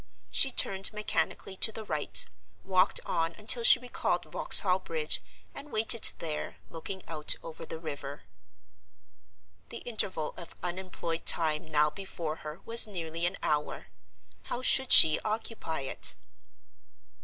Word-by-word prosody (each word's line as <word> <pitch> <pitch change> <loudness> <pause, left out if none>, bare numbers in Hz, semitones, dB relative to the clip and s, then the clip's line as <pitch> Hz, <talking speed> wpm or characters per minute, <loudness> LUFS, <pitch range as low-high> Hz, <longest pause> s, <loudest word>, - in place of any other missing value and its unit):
She 265 - +3
turned 195 -6 +1
mechanically 195 -2 -4
to 220 - +2
the 220 0 -9
right, 155 -7 0 0.4
walked 185 -1 0
on 165 0 -3
until 220 +3 +2
she 230 - +8
recalled 250 0 -4
Vauxhall 185 -2 +5
Bridge, 160 -4 -2 0.3
and 280 +1 -11
waited 220 +1 +3
there, 155 -2 -7
looking 185 +3 -7
out 155 -2 -1
over 165 0 -11
the - - -7
river. 145 -2 -9 1.5
The - - -10
interval 190 -9 -2
of 170 - -11
unemployed 175 -2 -6
time 155 -1 +4
now 150 -1 0
before 170 -5 -7
her 155 +4 -11
was 230 0 +5
nearly 170 -3 -5
an 185 - -6
hour. 150 -1 -4 0.6
How 250 - -6
should 265 0 +4
she 155 -1 +9
occupy 215 -8 -5
it? 135 - -1
170 Hz, 130 wpm, -27 LUFS, 155-210 Hz, 1.5 s, she